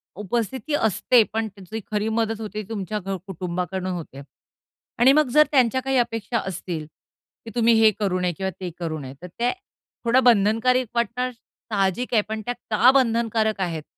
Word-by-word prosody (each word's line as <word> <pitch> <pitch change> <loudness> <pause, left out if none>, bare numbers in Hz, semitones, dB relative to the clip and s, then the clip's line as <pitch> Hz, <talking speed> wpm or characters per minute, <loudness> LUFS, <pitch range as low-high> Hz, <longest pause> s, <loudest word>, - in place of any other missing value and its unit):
उपस्थिती 235 - -3
असते, 225 0 +3
पण 225 0 -1
त्यांची 195 0 -12
तिथे 225 - -3
खरी 210 +1 0
मदत 225 0 -1
होते, 215 0 -5
तुमच्या 210 -1 -3
घ 195 0 -4
कुटुंबाकडून 180 0 -3
होतेय. 160 -6 -7 0.8
आणि 250 +3 +7
मग 305 0 +4
जर 300 0 +7
त्यांच्या 260 -2 +3
काही 270 0 0
अपेक्षा 230 -1 0
असतील. 175 -4 -5 0.6
की 225 - -8
तुम्ही 235 -1 +4
हे 220 -1 +6
करू 190 -3 0
नये 180 -1 0
किंवा 190 0 -2
ते 185 -2 -4
करू 165 -2 -3
नये. 135 -2 -8
तर 180 - -7
त्या, 235 +8 -1 0.5
थोडं 250 +3 +4
बंधनकारक 235 +3 +3
वाटणं 250 +2 -1
साहजिक 220 -1 -3
आहे, 220 - +5
पण 220 0 -3
त्या 245 - -1 0.2
का 230 +4 +6
बंधनकारक 230 -4 +1
आहेत? 165 -4 -2
220 Hz, 170 wpm, -23 LUFS, 190-240 Hz, 0.8 s, आणि